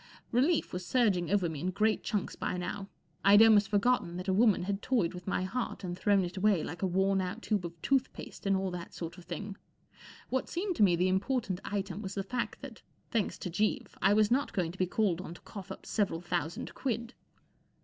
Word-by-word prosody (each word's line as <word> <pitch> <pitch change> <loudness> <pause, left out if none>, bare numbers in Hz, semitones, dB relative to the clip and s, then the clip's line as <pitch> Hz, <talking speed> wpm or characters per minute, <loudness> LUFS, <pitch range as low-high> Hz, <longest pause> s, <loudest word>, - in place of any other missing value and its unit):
Relief 285 +7 +2
was 180 0 -3
surging 190 -4 +2
over 195 -2 +2
me 160 -3 -5
in 180 +5 -1
great 215 +3 +1
chunks 210 -3 -2
by 180 - -2
now. 195 +2 -4 0.3
I'd 205 +2 +8
almost 210 -3 +6
forgotten 205 -4 +2
that 180 +2 -6
a 190 - +2
woman 210 -2 +4
had 200 +2 -2
toyed 225 -11 +1
with 180 +1 -9
my 190 - 0
heart 230 +3 -3
and 175 -1 -3
thrown 195 0 +3
it 175 +3 -7
away 190 -4 +3
like 175 - -6
a 190 - +2
worn 190 +1 +2
out 185 +5 -4
tube 205 -5 0
of 170 0 -14
tooth 270 -1 +2
paste - - -8
and 195 -1 +3
all 190 -1 -2
that 175 -1 -7
sort 170 +1 -6
of 175 - -14
thing. 195 +4 -6 0.7
What 260 0 -1
seemed 365 +1 -2
to - - +5
me 180 -4 +5
the 180 +2 +2
important 195 0 0
item 195 -1 -3
was 195 -2 -5
the 195 - -1
fact 240 +5 -3
that, 265 -5 -9 0.3
thanks 225 -4 0
to 180 - -5
Jeeves, 210 +5 0
I 195 +2 +5
was 215 0 +4
not 270 +3 +1
going 175 -5 0
to 185 - -13
be 185 - +2
called 185 -3 +1
on 170 -2 -8
to - - -14
cough 195 -2 -9
up - - -9
several 200 -6 0
thousand 175 -2 -3
quid. 235 -2 -3
195 Hz, 225 wpm, -31 LUFS, 180-220 Hz, 0.7 s, I'd